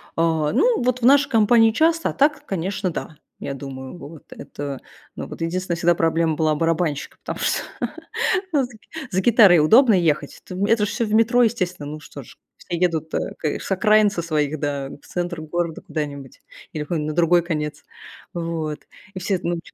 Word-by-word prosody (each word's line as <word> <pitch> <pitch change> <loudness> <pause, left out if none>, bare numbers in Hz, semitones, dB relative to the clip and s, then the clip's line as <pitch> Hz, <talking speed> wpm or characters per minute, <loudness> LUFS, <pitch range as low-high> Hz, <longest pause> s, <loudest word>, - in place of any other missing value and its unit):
Э, 160 -2 +1
ну 475 - +3
вот 250 0 0
в 235 - +1
нашей 285 +2 +5
компании 225 0 +5
часто, 325 +7 +2
а - - -4
так, 290 +1 +1
конечно, 190 0 -2
да, 155 -1 -6 0.2
я 140 - -4
думаю. 135 +2 -8
Вот 160 -1 -11
это, 140 -2 -7 0.4
ну - - -6
вот, - - -10
единственная 175 +1 -2
всегда 175 0 +3
проблема 165 -1 +1
была 155 0 +1
барабанщика, 165 -2 -1
потому - - -6
что, - - 0 0.9
ну, 280 -3 +3
за 245 - -6 0.4
за 190 - +1
гитарой 205 -5 +6
удобно 225 - +6
ехать, 155 -6 0
это 185 - -8
в 195 - 0
это 210 -1 +3
ж - - -4
все 230 - -1
в 210 - -3
метро, 230 +2 +4
естественно. 185 -9 -1
Ну 155 - -7
что - - -11
ж, - - -16 0.2
все 170 - -5
едут, 165 -3 -1
э, - - -2
к 155 - -2
с - - -7
окраин 215 +2 +4
со 195 -4 -3
своих, 155 -2 -1
да, 140 -2 -3
в 140 - -13
центр 175 -2 -3
города 165 +1 -3
куда-нибудь 145 -3 -6 0.3
или 150 -1 -4
на 155 -3 -2
другой 175 +1 +4
конец 150 -3 -4 0.5
вот. 165 -3 -3 0.3
И 185 - -6
все, 190 0 -1
ну 170 0 -1
чё - - -17
170 Hz, 190 wpm, -22 LUFS, 155-210 Hz, 0.9 s, гитарой